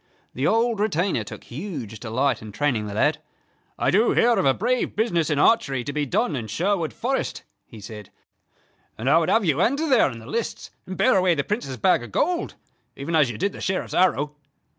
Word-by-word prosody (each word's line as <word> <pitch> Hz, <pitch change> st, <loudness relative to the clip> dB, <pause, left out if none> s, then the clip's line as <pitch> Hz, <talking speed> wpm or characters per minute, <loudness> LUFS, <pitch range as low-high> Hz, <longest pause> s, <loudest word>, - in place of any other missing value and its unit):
The 135 Hz, +4 st, 0 dB
old 230 Hz, 0 st, +2 dB
retainer 180 Hz, -, 0 dB
took 105 Hz, -, -10 dB
huge 130 Hz, -, -7 dB
delight 125 Hz, +2 st, 0 dB
in 110 Hz, -1 st, -9 dB
training 115 Hz, -3 st, -1 dB
the 100 Hz, -, -6 dB
lad. -, -, +1 dB, 0.6 s
"I -, -, +1 dB
do 215 Hz, +5 st, +3 dB
hear 240 Hz, -, +4 dB
of -, -, +1 dB
a 135 Hz, -, +5 dB
brave 245 Hz, +4 st, -1 dB
business 175 Hz, -8 st, +1 dB
in 150 Hz, -, 0 dB
archery 140 Hz, -, +3 dB
to 145 Hz, -, -5 dB
be 150 Hz, -1 st, -1 dB
done 205 Hz, -, 0 dB
in 115 Hz, -4 st, -4 dB
Sherwood 170 Hz, -, -1 dB
Forest," 260 Hz, +4 st, -3 dB, 0.2 s
he 110 Hz, -, -12 dB
said, 105 Hz, -1 st, -10 dB, 0.9 s
"and 115 Hz, -, -5 dB
I 155 Hz, +4 st, +6 dB
would 165 Hz, -, 0 dB
have 225 Hz, -2 st, +3 dB
you 155 Hz, 0 st, +2 dB
enter 280 Hz, +10 st, +1 dB
there 255 Hz, -, +4 dB
in 115 Hz, -, -8 dB
the 110 Hz, -, -12 dB
lists, 225 Hz, -, -4 dB, 0.2 s
and 185 Hz, -, -6 dB
bear 255 Hz, -, +4 dB
away 185 Hz, -2 st, +3 dB
the 140 Hz, -, 0 dB
Prince's 170 Hz, -, -3 dB
bag 110 Hz, -, +3 dB
of 120 Hz, -3 st, -9 dB
gold, 350 Hz, +1 st, -1 dB, 0.4 s
even 150 Hz, +4 st, -3 dB
as 150 Hz, -5 st, +4 dB
you 120 Hz, -, -5 dB
did 200 Hz, +3 st, -1 dB
the -, -, -9 dB
Sheriff's 190 Hz, 0 st, -2 dB
arrow." 150 Hz, -5 st, +2 dB
160 Hz, 210 wpm, -24 LUFS, 125-210 Hz, 0.9 s, I